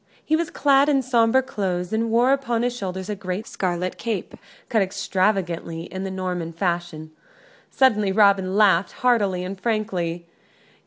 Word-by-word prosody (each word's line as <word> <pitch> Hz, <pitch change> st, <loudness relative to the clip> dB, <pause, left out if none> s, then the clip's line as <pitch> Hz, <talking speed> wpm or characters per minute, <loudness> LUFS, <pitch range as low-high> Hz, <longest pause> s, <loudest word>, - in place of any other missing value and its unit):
He 315 Hz, -, +2 dB
was 335 Hz, 0 st, -1 dB
clad 280 Hz, -1 st, +3 dB
in 275 Hz, -2 st, +2 dB
sombre 245 Hz, +1 st, +3 dB
clothes, 190 Hz, -7 st, -3 dB
and 225 Hz, +1 st, 0 dB
wore 240 Hz, +4 st, +4 dB
upon 240 Hz, -4 st, -1 dB
his 245 Hz, 0 st, -1 dB
shoulders 190 Hz, -4 st, -5 dB
a 210 Hz, -, -3 dB
great 190 Hz, +2 st, -5 dB
scarlet 180 Hz, -2 st, -3 dB
cape, 225 Hz, -6 st, -3 dB, 0.3 s
cut 220 Hz, -, +1 dB
extravagantly 190 Hz, -4 st, -1 dB
in 190 Hz, +2 st, -6 dB
the -, -, -3 dB
Norman 180 Hz, -3 st, -4 dB
fashion. 170 Hz, -2 st, -3 dB, 0.6 s
Suddenly 210 Hz, -7 st, +2 dB
Robin 195 Hz, -2 st, +3 dB
laughed, 195 Hz, -4 st, +3 dB
heartily 210 Hz, -8 st, +1 dB
and 190 Hz, +1 st, -6 dB
frankly. 185 Hz, -7 st, -2 dB
195 Hz, 150 wpm, -23 LUFS, 180-230 Hz, 0.6 s, wore